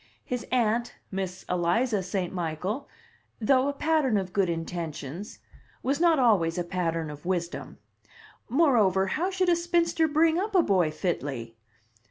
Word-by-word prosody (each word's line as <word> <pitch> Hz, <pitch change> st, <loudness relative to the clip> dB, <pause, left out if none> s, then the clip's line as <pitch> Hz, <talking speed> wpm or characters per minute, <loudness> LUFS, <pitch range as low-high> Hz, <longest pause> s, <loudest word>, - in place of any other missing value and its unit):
His 250 Hz, -2 st, -4 dB
aunt, 235 Hz, -1 st, +1 dB, 0.2 s
Miss 190 Hz, -1 st, -4 dB
Eliza 190 Hz, +6 st, +1 dB
St. 185 Hz, -1 st, -3 dB
Michael, 180 Hz, -, -3 dB, 0.5 s
though 260 Hz, +4 st, +3 dB
a 285 Hz, -, 0 dB
pattern 295 Hz, -6 st, +2 dB
of 190 Hz, -2 st, -3 dB
good 195 Hz, -3 st, +2 dB
intentions, 165 Hz, +1 st, -5 dB, 0.5 s
was 275 Hz, +3 st, 0 dB
not 335 Hz, -2 st, +5 dB
always 200 Hz, -10 st, +3 dB
a 175 Hz, -, 0 dB
pattern 165 Hz, -3 st, -2 dB
of 145 Hz, 0 st, -10 dB
wisdom. 175 Hz, -2 st, -3 dB, 0.7 s
Moreover, 225 Hz, -, +3 dB
how 355 Hz, +4 st, 0 dB
should 375 Hz, -1 st, +1 dB
a 345 Hz, -, +5 dB
spinster 340 Hz, -1 st, +1 dB
bring 320 Hz, +2 st, +3 dB
up 410 Hz, +1 st, -2 dB
a 360 Hz, -, +6 dB
boy 185 Hz, -, +2 dB
fitly? 140 Hz, -8 st, -3 dB
200 Hz, 145 wpm, -27 LUFS, 175-280 Hz, 0.7 s, a